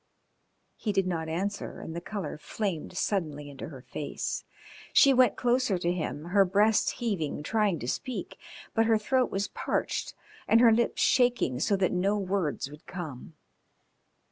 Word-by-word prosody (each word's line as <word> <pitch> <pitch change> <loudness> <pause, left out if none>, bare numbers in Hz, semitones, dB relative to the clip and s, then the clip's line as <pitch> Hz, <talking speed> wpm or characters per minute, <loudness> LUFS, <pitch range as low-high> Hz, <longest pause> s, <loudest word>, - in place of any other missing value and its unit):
He 215 - -1
did 195 -2 +1
not 165 -3 -2
answer 195 +5 -3
and 160 - -7
the 170 - -4
colour 200 -5 -5
flamed 185 -2 -4
suddenly 150 -9 -2
into 140 - -7
her 135 -5 -11
face. 145 - -4 0.5
She 275 - +7
went 255 -1 +5
closer 245 -4 +2
to 175 0 0
him, 160 -4 -3
her 200 +2 +5
breast 205 +4 +3
heaving, 180 - -2
trying 210 -1 +1
to 120 - -6
speak, 255 - -4 0.3
but 225 -1 +3
her 225 -1 +5
throat 255 +4 +1
was 195 +1 -2
parched - - -2 0.3
and 225 - +5
her 235 -1 +7
lips 235 +1 +2
shaking 245 - +3
so 200 +7 +2
that 190 -2 +1
no 195 +3 +1
words 190 -8 -1
would 150 +2 -14
come. 160 -5 -7
195 Hz, 160 wpm, -28 LUFS, 160-220 Hz, 0.5 s, She